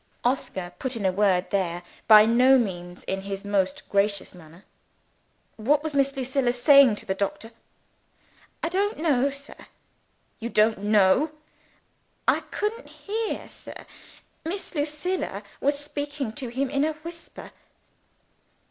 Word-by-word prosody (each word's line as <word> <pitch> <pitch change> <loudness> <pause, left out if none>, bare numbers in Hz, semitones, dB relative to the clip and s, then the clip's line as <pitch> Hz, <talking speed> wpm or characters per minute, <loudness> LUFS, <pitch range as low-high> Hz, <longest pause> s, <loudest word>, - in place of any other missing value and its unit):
Oscar 190 -8 -2
put 260 -1 -2
in 215 -4 -3
a 190 - +3
word 190 -2 +1
there 175 -3 -1 0.2
by 215 -1 +9
no 250 +4 +5
means 180 -6 -3
in 195 0 -3
his 195 +1 -6
most 195 -2 -1
gracious 200 0 0
manner. 170 +2 -16 0.9
"What 285 +7 +2
was 315 -2 -3
Miss 275 0 +2
Lucilla 260 -1 0
saying 265 -1 +6
to - - -6
the 190 - -1
doctor?" 200 +3 -4 1.1
"I 330 - +1
don't 400 +4 0
know, 280 -4 +2
sir." 280 +1 -11 0.7
"You 235 - -4
don't 215 -1 +3
know?" 210 +8 +3 0.9
"I - - +4
couldn't 445 +3 -4
hear, 440 +2 -4
sir. - - -11 0.6
Miss 380 +5 -5
Lucilla 300 - -2 0.2
was 285 +1 +1
speaking 290 -4 -5
to 265 -1 -5
him 260 +3 -2
in 280 0 +1
a 310 +1 +1
whisper." 335 +2 -10
250 Hz, 135 wpm, -25 LUFS, 200-295 Hz, 1.1 s, by